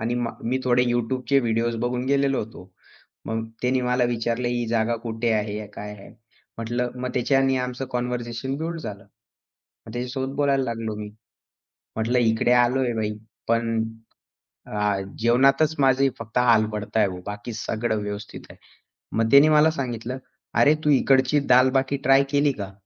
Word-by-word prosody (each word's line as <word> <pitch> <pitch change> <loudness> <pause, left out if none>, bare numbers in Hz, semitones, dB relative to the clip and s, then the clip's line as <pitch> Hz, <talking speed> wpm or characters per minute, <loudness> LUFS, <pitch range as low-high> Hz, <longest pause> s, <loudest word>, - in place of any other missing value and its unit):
आणि 115 +2 -1
मा 115 - -2
मी 125 +3 0
थोडे 125 -1 +3
YouTubeचे 125 +3 +1
व्हिडिओज 115 0 0
बघून 125 0 -1
गेलेलो 140 -1 +2
होतो. 100 -4 -8 0.6
मग 110 0 -2 0.2
त्यांनी 130 +1 +1
मला 125 0 +1
विचारलं, 120 0 -1
"ही 120 -1 -1
जागा 115 0 +1
कुठे 115 0 -1
आहे? 105 0 -2
काय 105 0 -7
आहे?" 100 -1 -13 0.5
म्हटलं, 120 +2 -2
मग 125 - -2
त्याच्याने 135 +1 +2
आमचं 125 +1 -3
कन्व्हर्सेशन 125 +1 -3
बिल्ड 165 +2 -4
झालं. 100 -8 -7 0.8
मग 110 - -9
त्याच्यासोबत 130 +3 -4
बोलायला 140 -2 +2
लागलो 115 -2 -3
मी. 105 0 -6 0.9
म्हटलं, 115 +3 +1
"इकडे 115 +1 +2
आलोय 125 +1 +3
भाई 105 -1 -2 0.3
पण 115 -1 +1 0.8
अ, 105 -1 -1 0.2
जेवणातच 135 +6 +3
माझी 135 0 +4
फक्त 115 +1 -5
हाल 115 -3 +4
पडतय 105 +1 0
हो 90 - -7
बाकी 105 +3 -6
सगळं 110 0 -2
व्यवस्थित 105 0 -6
आहे." - - -14 0.6
मग 115 0 +2
त्याने 140 +3 +7
मला 155 +1 +5
सांगितलं, 125 -3 -4 0.4
"अरे 150 +2 +5
तू 150 - +2
इकडची 135 +1 +4
दाल-बाटी 130 +2 +4
ट्राय 135 +1 +6
केली 145 0 +2
का?" 95 0 -6
120 Hz, 150 wpm, -24 LUFS, 110-130 Hz, 0.9 s, त्याने